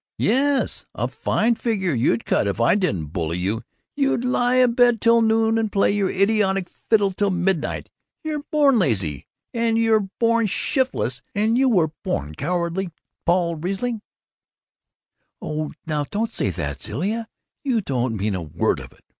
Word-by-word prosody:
"Yes, 275 +4 +1
a - - -1
fine 230 +2 +1
figure 205 -7 -1
you'd 115 -1 +1
cut - - +1
if 100 +2 -2
I 115 - +4
didn't 95 - -1
bully 85 -1 -2
you! 100 +6 -1 0.3
You'd 275 -4 +1
lie 250 0 +2
abed 245 -2 +4
till 230 +1 +4
noon 225 0 +3
and 220 -2 -1
play 195 - +3
your 200 -2 +1
idiotic 195 -2 +1
fiddle 205 -3 +1
till 200 +2 0
midnight! 180 -3 -1 0.4
You're 305 -2 -3
born 285 -5 +4
lazy, 95 - 0 0.3
and 230 -1 +1
you're 220 -3 +2
born 230 -1 +3
shiftless, 250 - -1
and 215 +3 +2
you're 225 - +3
born 75 - -2
cowardly, 175 - -2 0.4
Paul 170 -1 +2
Riesling 195 +7 -3 0.7
" - - -55
"Oh, 155 0 -4
now, 150 -2 -1
don't 220 +2 -2
say - - 0
that, 80 -5 -4
Zilla; 210 - -2 0.4
you 255 -5 +1
don't 125 - -1
mean 105 +1 -1
a 95 - -2
word 75 -3 -1
of - - -10
it!" - - -27
195 Hz, 155 wpm, -22 LUFS, 145-230 Hz, 0.7 s, I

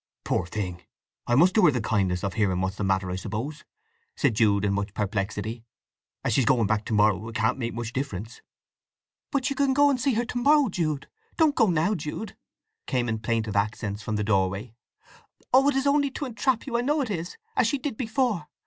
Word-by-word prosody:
"Poor 85 - -1
thing! 90 -3 -4 0.5
I 120 - +3
must 175 +7 +5
do 215 - +4
her - - +8
the 125 - -1
kindness 95 -5 0
of 100 -2 -2
hearing 95 -2 +1
what's 95 +1 -1
the - - -2
matter, 95 -1 0
I - - -2
suppose," 120 +11 -5 0.5
said 140 -6 +2
Jude 105 -2 +3
in 100 - +1
much 100 +1 -3
perplexity. 105 +2 -3 0.6
"As - - 0
she's 135 - +3
going 120 -3 +3
back 105 +1 0
to - - -3
morrow 105 0 +3
it 115 - -10
can't 110 +4 +1
make 115 -2 -3
much 120 0 -4
difference." 115 -4 -5 0.9
"But 275 -1 0
you - - -1
can 275 -1 +2
go 285 0 +5
and 255 -3 -1
see 270 -3 +2
her 240 +2 0
to 245 - -3
morrow, 285 0 +4
Jude! 155 -6 -2 0.3
Don't 315 -3 +4
go 230 -5 +3
now, 170 +5 +2
Jude!" 170 +5 -5 0.5
came 125 -2 0
in 110 -1 -1
plaintive 110 -2 -1
accents 105 0 -1
from 110 - -3
the 105 - 0
doorway. 100 +2 0 0.8
"Oh, 270 +2 +6
it 285 - 0
is 270 0 +1
only 285 0 +3
to 275 +2 -5
entrap 245 0 0
you, 235 -4 -1
I - - +1
know 295 +4 +1
it 245 -5 -2
is, 175 -2 -4 0.2
as - - +3
she 285 - 0
did 275 -2 -4
before! 225 - -1
120 Hz, 215 wpm, -26 LUFS, -, 0.9 s, her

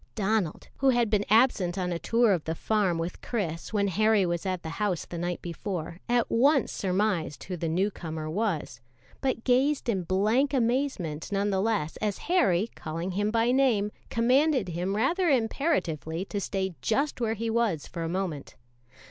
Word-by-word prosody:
Donald, 210 -5 -1
who 270 - +3
had 240 -4 +2
been 205 -1 +2
absent 210 -5 +3
on 180 -1 -1
a 170 - -2
tour 230 0 +3
of 170 -4 -2
the 160 - -2
farm 200 -3 +1
with 165 +2 -4
Chris 170 -8 -3
when 205 -2 +1
Harry 215 +1 +3
was 175 +1 -2
at 185 -2 -2
the 160 - -5
house 195 -5 0
the 175 - -7
night 175 0 -3
before, 170 -1 -5
at 240 -1 +2
once 275 +3 +3
surmised 185 -5 -1
who 185 - -5
the 165 -1 -3
new 190 +6 +1
comer 160 -4 -6
was, 165 - -2 0.4
but 260 -4 -1
gazed 265 +3 +2
in 200 -6 +1
blank 215 - +1
amazement, 235 - -1
none 200 +1 +1
the 190 -1 +1
less, 205 -8 -1
as 210 -2 -1
Harry, 210 - +3
calling 165 +4 -4
him 205 +3 0
by 230 +2 +2
name, 245 -6 +2 0.2
commanded 255 - +2
him 175 +4 -2
rather 335 - +2
imperatively 220 - 0
to 205 0 -4
stay 190 -1 -2
just 275 +3 0
where 225 -1 0
he 225 +1 -2
was 220 -10 0
for 170 - -7
a 165 - -2
moment. 175 -5 -3
200 Hz, 180 wpm, -28 LUFS, 175-235 Hz, 0.4 s, who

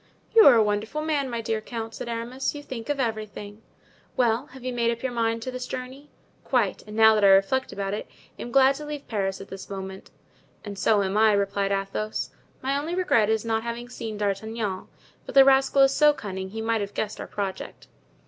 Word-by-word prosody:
"You 450 -6 +8
are 265 - +9
a 225 - +5
wonderful 215 +8 -2
man, 295 -4 0
my 235 -1 -3
dear 220 -1 -2
count," 225 0 -6
said 235 - -6
Aramis; 240 +5 -3
"you 290 - -7
think 240 -4 -7
of 290 -1 -1
everything." 215 -3 -4 0.6
"Well, 240 +2 +2
have 265 -3 -13
you 255 0 -3
made 235 -1 +1
up 235 +1 -3
your 260 - -1
mind 230 -1 -1
to 255 - -4
this 255 0 -5
journey?" 260 +3 -7 0.3
"Quite; 235 -7 0
and 210 - -8
now 220 0 +7
that 210 -1 +1
I - - +7
reflect 195 +7 +3
about 195 0 -3
it, 210 - -4
I - - -17
am 240 - -6
glad 270 +1 +5
to 300 - -7
leave 295 -1 -6
Paris 195 -3 -2
at 195 - -11
this 190 0 -9
moment." 190 -1 -7 0.6
"And 205 -1 -6
so 210 -1 +3
am 195 +2 -1
I," 215 0 +5
replied 200 0 0
Athos; 195 +2 -2 0.3
"my 270 +1 0
only 310 +5 -2
regret 235 - +2
is 220 0 0
not 225 -1 0
having 235 +1 -5
seen 225 -4 -6
D'Artagnan; 205 -1 -3 0.4
but - - -8
the 270 -1 +9
rascal 270 0 +5
is 270 0 +4
so 300 +1 +5
cunning, 190 -7 -6
he 220 +3 -6
might 225 -1 0
have 200 0 -5
guessed 215 -1 -3
our - - -6
project." 195 -2 -5
225 Hz, 220 wpm, -25 LUFS, 205-260 Hz, 0.6 s, are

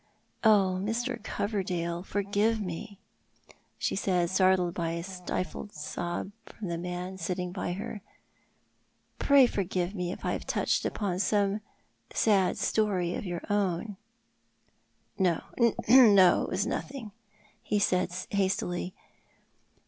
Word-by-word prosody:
Oh, 195 -4 +4
Mr. 235 +4 -2
Coverdale, 180 -5 -2
forgive 205 +3 0
me," 200 +2 -6 0.8
she - - -1
said, 180 -3 +1
startled 185 -2 +3
by 165 -2 -2
a 170 0 -3
stifled 185 +2 -5
sob 175 +5 -4 0.2
from 200 -5 -7
the 170 - -2
man 180 +2 -5
sitting 180 +1 -2
by 180 -1 -3
her 200 +3 -5
side; - - -32 1.0
"pray 280 -2 +6
forgive 185 -4 -1
me 180 -3 -2
if - - -7
I - - +1
have - - -5
touched - - +1
upon 190 -4 -2
some 205 +1 +1 0.5
sad 195 -4 +2
story 190 -5 +1
of 195 - -4
your 175 -1 -4
own 205 0 0 0.6
" - - -35
"No, 180 -4 +2 0.4
no; 210 -7 +7
it - - -6
was 185 +2 0
nothing," 255 -4 -4 0.5
he 210 - -1
said, 185 -3 +2 0.2
hastily. 185 -2 -1
190 Hz, 125 wpm, -29 LUFS, 180-205 Hz, 1.0 s, no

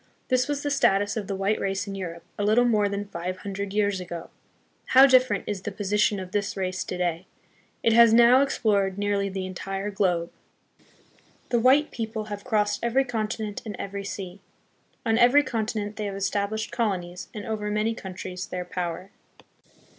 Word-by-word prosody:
This 255 0 +2
was 290 -1 -2
the 290 - -1
status 205 -7 +2
of 210 -3 -3
the 195 - -2
white 195 +2 0
race 195 0 -1
in 200 - -6
Europe 170 -3 -6
a 205 - -3
little 220 +4 +4
more 210 -4 +2
than 200 0 -3
five 185 -1 -5
hundred 200 +1 -5
years 200 -2 +1
ago. 175 -2 -7 0.6
How 265 +1 +10
different 255 -6 +4
is 205 -3 -3
the 205 - -4
posi 205 +1 -2
tion 205 -1 +3
of 185 -1 -7
this 200 0 -2
race 185 -1 -2
to 180 - -4
day! 175 0 -2 0.6
It 230 - +4
has 235 0 +7
now 235 +3 +7
explored 200 -8 +1
nearly 200 -1 0
the 190 -1 -4
entire 195 +2 -4
globe. 180 -4 0 1.2
The 240 - +2
white 270 +5 +4
people 220 -2 -4
have 205 - -7
crossed 210 -4 0
every 240 +3 +2
con 225 -4 -1
tinent 215 -2 -5
and 215 -3 -6
every 200 0 -5
sea. 195 -1 -6 0.7
On 225 0 +2
every 260 +5 +6
continent 215 -4 -3
they, 215 - -3
have 200 -1 -4
estab 200 +1 -1
lished 220 0 -4
colonies 180 -6 -2
and 210 -2 -7
over 210 -1 -3
many 215 +2 0
countries 185 -2 -7
their 180 0 -4
power. 180 0 -4
205 Hz, 185 wpm, -26 LUFS, 190-225 Hz, 1.2 s, How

